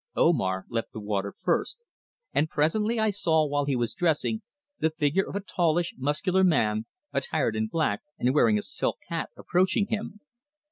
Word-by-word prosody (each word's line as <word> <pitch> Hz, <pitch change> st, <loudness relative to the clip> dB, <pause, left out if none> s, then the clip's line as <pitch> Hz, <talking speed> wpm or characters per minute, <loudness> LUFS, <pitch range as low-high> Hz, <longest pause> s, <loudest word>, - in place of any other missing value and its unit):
Omar 95 Hz, -, +2 dB
left 115 Hz, -1 st, -3 dB
the -, -, -5 dB
water 100 Hz, -1 st, -2 dB
first, 475 Hz, -, -1 dB, 0.5 s
and 155 Hz, +2 st, +2 dB
presently 210 Hz, +11 st, +1 dB
I 220 Hz, -1 st, +3 dB
saw 160 Hz, -6 st, +2 dB
while 145 Hz, -1 st, 0 dB
he 140 Hz, -2 st, 0 dB
was 120 Hz, -2 st, 0 dB
dressing 175 Hz, +6 st, 0 dB, 0.4 s
the 160 Hz, -, +2 dB
figure 160 Hz, +4 st, 0 dB
of -, -, -7 dB
a 200 Hz, -, -1 dB
tallish, 175 Hz, -3 st, 0 dB
muscular 150 Hz, +8 st, +1 dB
man 110 Hz, -11 st, +2 dB, 0.3 s
attired 130 Hz, -8 st, 0 dB
in 110 Hz, 0 st, 0 dB
black 110 Hz, -5 st, 0 dB, 0.2 s
and 125 Hz, +1 st, +1 dB
wearing 115 Hz, -7 st, +4 dB
a 105 Hz, -, -2 dB
silk -, -, -2 dB
hat -, -, -2 dB
approaching 185 Hz, +3 st, +2 dB
him. 210 Hz, -1 st, -3 dB
155 Hz, 170 wpm, -27 LUFS, 115-185 Hz, 0.5 s, wearing